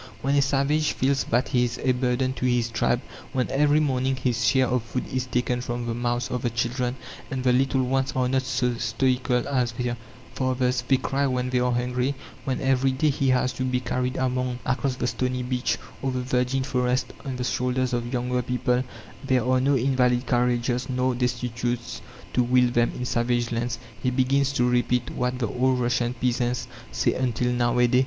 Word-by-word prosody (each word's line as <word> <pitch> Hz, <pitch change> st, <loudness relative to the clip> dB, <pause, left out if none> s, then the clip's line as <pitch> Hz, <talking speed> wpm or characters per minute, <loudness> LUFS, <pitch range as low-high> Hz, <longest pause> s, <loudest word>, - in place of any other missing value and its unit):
When 135 Hz, +1 st, +1 dB
a 140 Hz, -, +4 dB
"savage" 140 Hz, +3 st, +1 dB
feels 135 Hz, +1 st, +1 dB
that 120 Hz, +3 st, +1 dB
he 125 Hz, -1 st, +2 dB
is 120 Hz, -, -4 dB
a 130 Hz, -, +3 dB
burden 125 Hz, +1 st, 0 dB
to 130 Hz, -, -1 dB
his 120 Hz, -2 st, +1 dB
tribe; -, -, +1 dB, 0.3 s
when 130 Hz, -2 st, 0 dB
every 145 Hz, +2 st, +3 dB
morning 135 Hz, -3 st, +1 dB
his 125 Hz, -2 st, -1 dB
share 130 Hz, -2 st, +4 dB
of 125 Hz, 0 st, 0 dB
food 115 Hz, +3 st, -4 dB
is 130 Hz, -1 st, -1 dB
taken 125 Hz, 0 st, 0 dB
from 120 Hz, -1 st, -3 dB
the 115 Hz, -, -2 dB
mouths 120 Hz, 0 st, -1 dB
of 125 Hz, -, -2 dB
the 120 Hz, -, 0 dB
children 120 Hz, +2 st, -1 dB, 0.3 s
and 130 Hz, -1 st, -3 dB
the 125 Hz, -1 st, +4 dB
little 130 Hz, +1 st, +2 dB
ones 135 Hz, +1 st, 0 dB
are 130 Hz, -1 st, +2 dB
not 130 Hz, +1 st, +1 dB
so 125 Hz, -1 st, 0 dB
stoical 125 Hz, +2 st, +1 dB
as 125 Hz, -4 st, 0 dB
their 120 Hz, 0 st, -2 dB, 0.4 s
fathers: 130 Hz, -1 st, 0 dB
they 135 Hz, -, +4 dB
cry 140 Hz, +2 st, 0 dB
when 125 Hz, -1 st, -1 dB
they 125 Hz, -, +2 dB
are 125 Hz, 0 st, +1 dB
hungry; 125 Hz, +3 st, 0 dB, 0.3 s
when 130 Hz, -2 st, -1 dB
every 135 Hz, 0 st, +2 dB
day 150 Hz, +3 st, +2 dB
he 135 Hz, -1 st, 0 dB
has 130 Hz, 0 st, +2 dB
to 130 Hz, -, -3 dB
be 125 Hz, -1 st, 0 dB
carried 125 Hz, +1 st, -2 dB
across 130 Hz, +1 st, -1 dB
the 125 Hz, -, -2 dB
stony 125 Hz, +2 st, -1 dB
beach, 125 Hz, -2 st, 0 dB, 0.2 s
or 135 Hz, -, -1 dB
the 125 Hz, -1 st, -2 dB
virgin 125 Hz, +1 st, 0 dB
forest, 125 Hz, -1 st, 0 dB
on 135 Hz, -2 st, -4 dB
the 125 Hz, -, -3 dB
shoulders 125 Hz, 0 st, 0 dB
of 120 Hz, 0 st, -2 dB
younger 125 Hz, 0 st, 0 dB
people 125 Hz, 0 st, 0 dB, 0.4 s
there 130 Hz, -3 st, +1 dB
are 130 Hz, 0 st, +3 dB
no 140 Hz, +2 st, +3 dB
invalid 125 Hz, -1 st, +2 dB
carriages, 125 Hz, 0 st, +1 dB
nor 130 Hz, 0 st, +1 dB
destitutes 120 Hz, -1 st, -2 dB, 0.3 s
to 125 Hz, -, +3 dB
wheel 125 Hz, 0 st, +3 dB
them 120 Hz, -1 st, +2 dB
in 125 Hz, -, -4 dB
savage 120 Hz, -1 st, 0 dB
lands 115 Hz, 0 st, -1 dB, 0.2 s
he 125 Hz, -, +1 dB
begins 135 Hz, +2 st, +2 dB
to 125 Hz, -3 st, +1 dB
repeat 125 Hz, 0 st, +1 dB
what 125 Hz, 0 st, -1 dB
the 120 Hz, -3 st, -1 dB
old 130 Hz, +3 st, +1 dB
Russian 120 Hz, 0 st, 0 dB
peasants 120 Hz, -1 st, -1 dB, 0.2 s
say -, -, +1 dB
until 125 Hz, -1 st, 0 dB
now 120 Hz, 0 st, +1 dB
a 125 Hz, -, +5 dB
day. 125 Hz, +1 st, +3 dB
125 Hz, 200 wpm, -25 LUFS, 120-130 Hz, 0.4 s, a